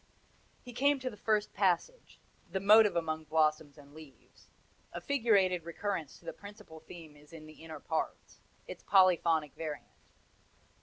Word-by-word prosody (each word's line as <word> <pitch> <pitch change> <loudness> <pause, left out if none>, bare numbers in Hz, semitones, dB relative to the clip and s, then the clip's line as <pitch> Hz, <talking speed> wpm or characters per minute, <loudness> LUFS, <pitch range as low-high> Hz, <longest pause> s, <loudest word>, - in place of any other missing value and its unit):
He 245 - -11
came 280 +3 +2
to 255 -1 -4
the - - -11
first 210 0 -1
passage 200 - -1 0.3
the 190 - -1
motive 210 +1 +6
among 160 -2 -2
blossoms 155 -1 0
and 145 -1 -16
leaves 155 -3 -17 0.4
a - - -6
figurated 200 - +1
recurrence 170 -2 -5
to - - -22
the - - -5
principal 200 -6 -13
theme 160 -1 -13
is 150 +1 -20
in 160 -2 -11
the 155 0 -15
inner 160 -2 -9
parts 160 +2 -5 0.3
its - - -10
polyphonic 170 -6 +3
variant. 155 -2 -6
170 Hz, 150 wpm, -31 LUFS, 155-205 Hz, 0.4 s, motive